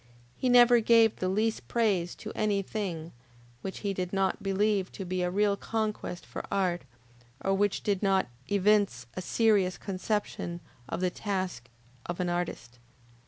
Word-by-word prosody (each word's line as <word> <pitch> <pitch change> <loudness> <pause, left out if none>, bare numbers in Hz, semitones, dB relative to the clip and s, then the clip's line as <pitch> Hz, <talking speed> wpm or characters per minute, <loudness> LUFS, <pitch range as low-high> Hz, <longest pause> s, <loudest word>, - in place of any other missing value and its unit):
He 255 - 0
never 245 -1 +7
gave 225 -1 +5
the 185 - -1
least 215 +3 0
praise 200 -7 +1
to - - -7
any 205 -2 +1
thing 175 -6 -4 0.5
which 190 - -6
he 200 -2 -1
did 180 -1 -3
not 195 -1 0
believe 195 0 +1
to 195 - -6
be 185 0 -2
a 180 - +1
real 200 +2 +2
conquest 215 -4 -3
for - - -6
art, 180 -3 +1 0.6
or 195 - 0
which 205 +1 +1
did 200 -3 0
not 195 -2 +3 0.2
evince 200 - +2
a 185 - -4
serious 200 -3 +2
conception 190 -3 -3 0.3
of - - -3
the 180 -1 +1
task 185 - -3 0.4
of 175 +1 -4
an 180 -1 0
artist. 145 -9 -3
195 Hz, 160 wpm, -29 LUFS, 180-210 Hz, 0.6 s, never